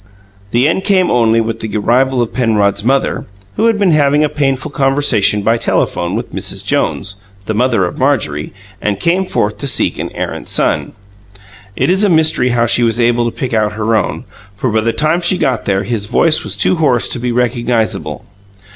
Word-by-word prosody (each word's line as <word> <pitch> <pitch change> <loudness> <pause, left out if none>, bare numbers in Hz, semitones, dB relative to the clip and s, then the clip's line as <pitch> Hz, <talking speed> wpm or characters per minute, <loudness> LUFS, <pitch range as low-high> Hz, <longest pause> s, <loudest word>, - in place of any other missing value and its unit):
The 120 +6 +2
end 180 +4 0
came 190 -3 +2
only 115 -2 +3
with 115 0 -3
the 110 -1 -4
arrival 125 +4 +2
of 115 - -6
Penrod's 105 -5 +1
mother, 135 +4 0 0.3
who 225 - +2
had 225 -2 +2
been 200 -4 +2
having 145 -1 +3
a 150 - +1
painful 140 -1 -1
conversation 135 -7 +1
by 115 +2 +2
telephone 90 -5 -1
with 115 +2 -5
Mrs. - - -4
Jones, 100 - -1 0.3
the 110 - -2
mother 115 -3 +1
of 90 - -6
Marjorie, 105 - 0 0.3
and 100 -2 -1
came 180 +3 0
forth 105 - -1
to 140 - -3
seek - - +1
an - - -4
errant - - -5
son. - - 0 0.8
It 135 +7 +1
is 190 +3 +2
a 205 - +3
mystery 160 -6 +2
how 120 -1 +1
she 120 - +2
was 115 0 +1
able 120 0 +2
to - - -14
pick 130 -3 -3
out 105 -1 +1
her 110 +1 0
own, 80 -7 -2 0.3
for 120 +4 -2
by 110 +1 +1
the 115 +1 0
time 155 +7 0
she 180 +1 +3
got 125 -9 -1
there 100 0 0
his 110 -2 -2
voice 155 +7 +2
was 100 -1 -3
too 105 - +2
hoarse 135 -7 +2
to 125 - -3
be 125 0 -2
recognizable. 120 -1 -1
120 Hz, 200 wpm, -14 LUFS, 110-145 Hz, 0.8 s, only